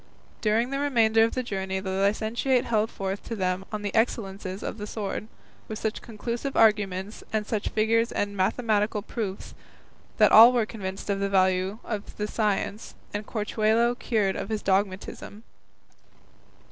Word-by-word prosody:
During 225 +4 +1
the 275 - -1
remainder 225 -6 +3
of 225 - 0
the 255 - -1
journey 190 -4 -3
the 190 0 -4
licentiate 220 +6 +1
held 220 -1 +1
forth 195 0 -4
to 230 - -4
them 185 -1 -1
on 210 -1 -4
the 205 - -3
excellences 195 -4 -1
of 215 - -5
the 210 - -5
sword, 210 0 -4 0.4
with 220 - -5
such 220 +1 -3
conclusive 235 +4 -4
arguments, 205 -2 +2
and 215 -1 0
such 215 -1 -2
figures 225 +2 +2
and 205 0 -2
mathematical 210 +1 +1
proofs, 205 -3 -5 0.6
that - - +5
all 230 +3 +10
were 235 -3 +2
convinced 200 -2 -5
of 195 - -1
the 200 0 0
value 190 +1 +2
of 210 -3 -5
the 210 - -1
science, 210 0 -2 0.2
and 205 +1 -4
Corchuelo 220 +2 +1
cured 220 -6 0
of - - -4
his 215 -1 -2
dogmatism. 195 +2 -2
210 Hz, 160 wpm, -26 LUFS, 195-225 Hz, 0.6 s, all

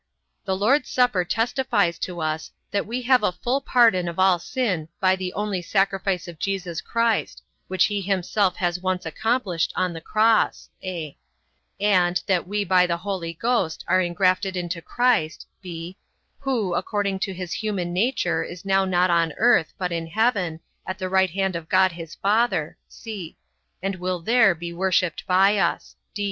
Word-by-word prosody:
The 190 -1 -1
Lord's 255 +8 +2
supper 245 -8 +2
testifies 220 -2 0
to 175 -2 -4
us, 155 0 -2 0.2
that 200 -1 -1
we 245 +3 -3
have 255 +1 +4
a 210 - +2
full 245 +10 -1
pardon 225 -9 +3
of 170 - -5
all 185 -2 +4
sin 185 - -2
by 190 0 +3
the 185 -1 -4
only 205 -3 -2
sacrifice 195 -1 0
of 170 -2 -10
Jesus 190 -2 -3
Christ, 230 0 0 0.2
which 185 0 +3
he 205 -1 -1
himself 190 0 0
has 175 -1 -1
once 185 -1 -1
accomplished 195 0 -1
on 185 -1 0
the 165 - -7
cross; 215 +5 +2
(a) 170 -6 -5 0.6
and, 180 -3 +3
that 185 -3 0
we 205 +1 -1
by 180 -1 +4
the 170 -1 -1
Holy 180 -3 -4
Ghost 225 -4 -1
are 185 +1 +3
ingrafted 185 +2 +1
into 175 -1 -3
Christ, 240 -8 +1 0.2
(b) 175 -1 -7 0.4
who, 245 -10 -1
according 200 -1 -1
to 195 - -2
his 180 0 -5
human 195 -5 -2
nature 200 -1 +1
is 175 +1 -9
now 195 0 +3
not 180 -1 +2
on 165 -2 +2
earth, 225 -8 +4
but 180 -1 -2
in 165 -1 -3
heaven, 185 -4 0 0.3
at 185 - -3
the 185 -2 -4
right 190 0 +3
hand 190 +1 -1
of 165 -1 -6
God 185 0 +4
his 165 -2 -9
Father, 200 -6 +1
(c) 200 -8 -8 0.5
and 195 -1 -2
will 180 0 -2
there 220 +1 +4
be 170 +1 -6
worshipped 180 -1 0
by 195 +3 +4
us. 170 -3 -1
185 Hz, 170 wpm, -24 LUFS, 175-210 Hz, 0.6 s, have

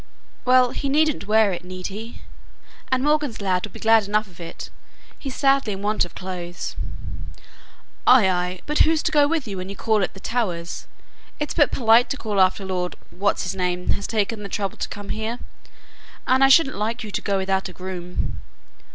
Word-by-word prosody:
"Well, 255 -1 +5
he 280 - -3
needn't 300 -6 +2
wear 215 -1 +4
it, 175 0 -5
need 185 0 -8
he? 225 +3 -8 0.7
and 260 0 +2
Morgan's 295 -5 +1
lad 185 -3 0
will - - -18
be - - -11
glad 225 -2 +4
enough 210 +1 +1
of 180 -4 -18
it, 165 -1 -8 0.5
he's 270 -3 -6
sadly 270 -6 +2
in 195 +1 -7
want 210 -2 +1
of 175 - -14
clothes." 180 -1 -5 1.3
"Ay, 250 -6 +7
ay; 180 0 -1
but 300 0 -1
who's 320 -1 +4
to - - 0
go 295 -2 +5
with 310 -4 -1
you 200 -2 -5
when 185 +1 -5
you 200 - -6
call 215 0 +1
at 190 - -2
the - - -9
Towers? 185 -8 -3 0.5
It's 295 - -2
but 290 - +4
polite 230 0 +4
to 280 - -2
call 210 -5 0
after 190 +1 +2
Lord 180 -1 -2 0.2
What's 200 +3 0
his 180 - -2
name 180 -1 -2
has 200 - -1
taken 215 0 -1
the 200 - -6
trouble 195 0 -3
to - - -3
come 205 -1 -8
here; 220 +2 -3 0.9
and 260 +1 +4
I 270 - +7
shouldn't 270 -3 +5
like 225 +3 -2
you 215 - -7
to - - -2
go 200 -1 0
without 190 0 0
a - - -8
groom." 180 -1 -5
210 Hz, 200 wpm, -23 LUFS, 185-255 Hz, 1.3 s, Ay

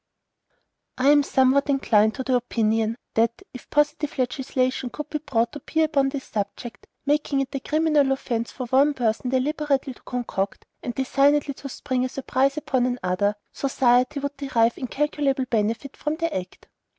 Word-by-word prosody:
I 265 +2 +3
am 290 0 +6
somewhat 275 +1 +3
inclined 220 -6 +3
to 260 - -3
the 255 - 0
opinion, 225 -1 0 0.2
that, 230 +9 +1
if 250 - -11
positive 295 +1 0
legislation 255 0 -1
could 300 +5 -7
be 300 - -1
brought 235 -6 0
to 295 - -7
bear 320 +3 +1
upon 280 -3 +2
this 270 -1 -5
subject, 215 +3 -5 0.2
making 290 -1 +1
it 270 +1 -5
a 275 - -1
criminal 305 -1 +2
offence 235 -3 -2
for 255 - -5
one 275 +4 +3
person 235 0 0
deliberately 275 +1 0
to - - -21
concoct 220 -5 -3 0.2
and 240 - -5
designedly 280 +2 +2
to 275 +1 -8
spring 255 -1 -2
a 255 - -1
surprise 270 +2 0
upon 260 -4 +1
another, 205 -4 0 0.2
society 255 0 +2
would 285 +1 -4
derive 240 -5 +2
incalculable 275 0 -1
benefit 230 +3 -1
from 300 +1 -2
the 330 0 -2
act. 185 0 -6
265 Hz, 165 wpm, -24 LUFS, 240-285 Hz, 0.2 s, am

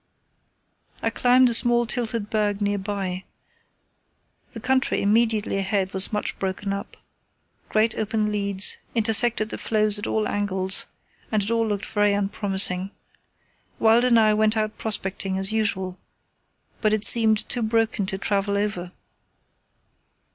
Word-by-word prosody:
I 225 - +1
climbed 250 +2 +4
a 240 - 0
small 240 +1 +3
tilted 230 -3 -2
berg 210 -2 0
nearby. 200 -2 -2 1.3
The 230 - -9
country 260 +3 +1
immediately 215 -1 +1
ahead 195 -1 -1
was 190 0 -3
much 210 -1 -3
broken 195 +1 -3
up. 200 - -7 0.7
Great 220 +1 +2
open 215 -1 -1
leads 200 -1 +1 0.2
intersected 225 0 +2
the - - -5
floes 215 -1 +3
at 205 - -4
all 215 -1 0
angles, 190 -2 -1 0.4
and 215 -2 +1
it 205 - -3
all 230 -1 +1
looked 205 -1 -2
very 205 -1 +1
unpromising. 195 -2 0 0.9
Wild 225 +2 +4
and 240 -2 +4
I 215 -1 +4
went 215 +1 +2
out 215 0 -2
prospecting 195 -3 -3
as 195 +2 +1
usual, 190 -4 -1 0.8
but 215 -1 +2
it 215 0 0
seemed 220 -2 +2
too 245 - -2
broken 225 -2 0
to 190 - -3
travel 200 0 -1
over. 185 -4 -3
210 Hz, 135 wpm, -24 LUFS, 195-225 Hz, 1.3 s, climbed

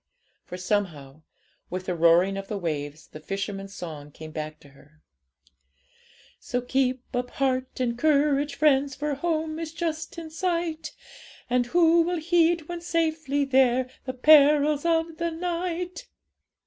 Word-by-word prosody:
For, 180 - -6
somehow, 165 -7 -2 0.5
with 185 +1 -4
the 185 - -1
roaring 170 +3 +4
of 195 0 -5
the 210 - -3
waves 155 -4 -4
the 155 - -10
fishermen's 195 +3 -5
song 155 -4 -7
came 155 +1 -10
back 155 0 -6
to 145 - -16
her 150 +2 -22 1.4
'So 250 - -2
keep 255 0 0
up 245 0 -1
heart 260 -1 -1
and 240 -2 0
courage, 290 0 +2
friends! 280 -2 +3
For 295 +1 -2
home 315 +1 -2
is 325 -1 -5
just 330 +2 -4
in 325 -1 -7
sight; 335 -2 -2 0.6
And 245 -1 +2
who 335 +3 +4
will 350 +1 0
heed, 335 -1 +2
when 345 -1 -5
safely 315 -4 0
there, 260 -1 +3
The 255 - -3
perils 295 +2 +5
of 325 -1 +1
the 340 0 -1
night?' 350 +1 -4
275 Hz, 145 wpm, -26 LUFS, 195-325 Hz, 1.4 s, perils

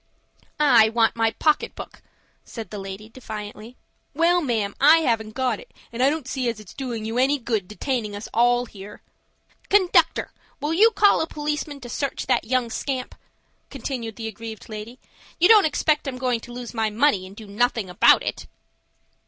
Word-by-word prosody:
"I 240 -7 +6
want 225 0 +2
my 225 -1 +2
pocket 300 +7 0
book," - - -10 0.4
said 225 -5 -9
the 210 - -6
lady, 195 +2 -8
defiantly. 220 0 -9 0.4
"Well, 345 +3 +3
ma'am, 220 -8 -1
I 310 +4 +7
haven't 220 -6 -1
got 255 -5 0
it, - - -14 0.2
and 235 - -3
I 265 - +5
don't 300 -3 -3
see 255 -2 -1
as 225 -2 -5
it's 210 -4 -13
doing 240 -5 -5
you 225 +2 -2
any 275 +3 +3
good 225 -7 -2
detaining 215 -1 -3
us 205 - -7
all 245 +1 +3
here." 205 -2 -12 0.7
"Conductor, 390 -3 +3 0.3
will 295 +3 -2
you 425 +7 +6
call 410 -2 +4
a 320 - -1
policeman 295 -1 -4
to 245 - -8
search 275 +3 -3
that 260 - +1
young 245 0 0
scamp?" 260 0 -3 0.6
continued 240 -4 -5
the 225 -1 -5
aggrieved 220 0 -9
lady. 215 +3 -8 0.4
"You 350 - +6
don't 425 -3 +7
expect 305 -1 +1
I'm 260 -2 -4
going 250 -2 0
to 240 - -12
lose 245 -1 -7
my 225 -2 0
money, 215 -4 +1
and 195 - -13
do 220 - -10
nothing 215 0 0
about 180 - +5
it." - - -5
240 Hz, 180 wpm, -23 LUFS, 220-280 Hz, 0.7 s, I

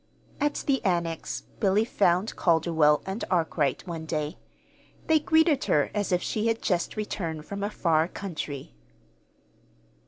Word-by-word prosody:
At 295 0 0
the 270 -2 +1
Annex 170 -3 -1 0.2
Billy 205 +1 +3
found 195 -2 +1
Calderwell 160 -3 +3
and 190 +4 -4
Arkwright, 160 -6 0
one 165 -3 -6
day. 155 +1 -3 0.7
They 320 -1 +4
greeted 320 -1 +3
her 145 - +2
as 205 -2 -1
if 180 0 +1
she 220 +1 -1
had 225 0 +1
just 180 +1 -1
returned 165 -7 -3
from 200 +3 -6
a 205 - 0
far 165 -5 +2
country. 155 -8 -6
180 Hz, 135 wpm, -27 LUFS, 160-215 Hz, 0.7 s, They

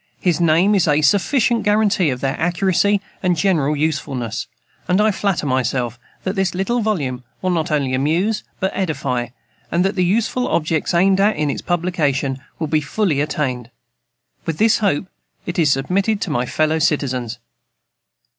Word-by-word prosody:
His 175 -2 +1
name 170 +5 +4
is 190 -4 +3
a 150 0 +3
sufficient 230 - +2
guaranty 210 -5 +2
for 125 - -1
their 135 +1 -2
accuracy 185 +3 +2 0.2
and 180 -2 +1
general 155 -5 +2
usefulness; 140 -6 -2 0.4
and 180 +2 +2
I 215 +1 +4
flatter 195 -5 -1
myself 125 -2 -1 0.2
that 190 +2 -2
this 190 -2 0
little 235 +6 0
volume 140 - -2 0.2
will 185 - +1
not 165 -3 0
only 140 -4 0
amuse, 165 +11 0 0.2
but 190 - 0
edify, 140 -9 -2 0.4
and 175 +2 +2
that 195 - +1
the 185 - +2
useful 230 +6 +1
objects 160 +1 0
aimed 190 +2 +4
at 210 +2 +3
in 150 -1 0
its - - -5
publication 155 -7 -1 0.2
will 160 - -2
be 155 0 +1
fully 150 -1 0
attained. 130 -5 -2 0.8
With 160 - -2
this 220 0 +3
hope, 195 -5 +1 0.4
it 175 0 -3
is 155 -4 +4
submitted 190 +10 +1
to 170 - -2
my 125 -3 0
fellow 155 +3 +1
citizens. 130 -7 0
165 Hz, 165 wpm, -19 LUFS, 140-195 Hz, 0.8 s, name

